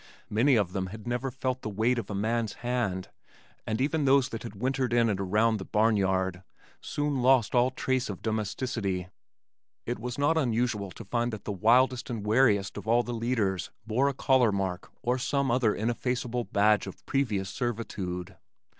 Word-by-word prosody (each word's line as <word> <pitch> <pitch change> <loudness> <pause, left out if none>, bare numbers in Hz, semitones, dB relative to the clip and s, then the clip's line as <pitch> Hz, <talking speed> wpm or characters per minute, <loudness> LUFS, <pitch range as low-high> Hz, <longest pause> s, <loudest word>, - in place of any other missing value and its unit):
Many 125 +6 +4
of 100 -5 +1
them 95 -2 -2
had 105 +3 -9
never 120 +2 -2
felt 130 0 -3
the - - -4
weight 115 +4 +1
of 105 - -6
a 100 - -3
man's 110 +2 0
hand, 115 -7 -1 0.6
and 110 +1 -1
even 150 +3 +1
those 135 -1 +4
that 115 -3 -5
had 115 -3 -8
wintered 130 +3 -1
in 120 -1 +4
and 100 - -2
around 105 +4 +2
the 95 - -6
barn 110 +1 +2
yard 95 -2 0 0.4
soon 145 -3 -1
lost 125 -3 +4
all 125 0 +4
trace 130 -1 -1
of 95 - -6
domesticity. 110 -4 -2 0.8
It 120 - -3
was 125 +1 -5
not 145 +3 +2
unusual 120 -6 0
to 100 +5 -10
find 120 +3 -1
that 110 -3 -7
the - - -3
wildest 120 +6 +3
and 115 -4 -4
wariest 105 -3 +3
of - - -7
all 120 +2 +4
the 120 - -5
leaders 110 -6 -1 0.2
bore 120 +5 +2
a 140 - -4
collar 130 -4 +3
mark 95 -2 -3
or 125 +2 +1
some 140 +1 0
other 120 -3 +2
ineffaceable 120 +1 -1
badge 105 -1 +2
of 95 - -10
previous 105 -9 -1
servitude. 100 -8 -4
115 Hz, 180 wpm, -28 LUFS, 100-125 Hz, 0.8 s, Many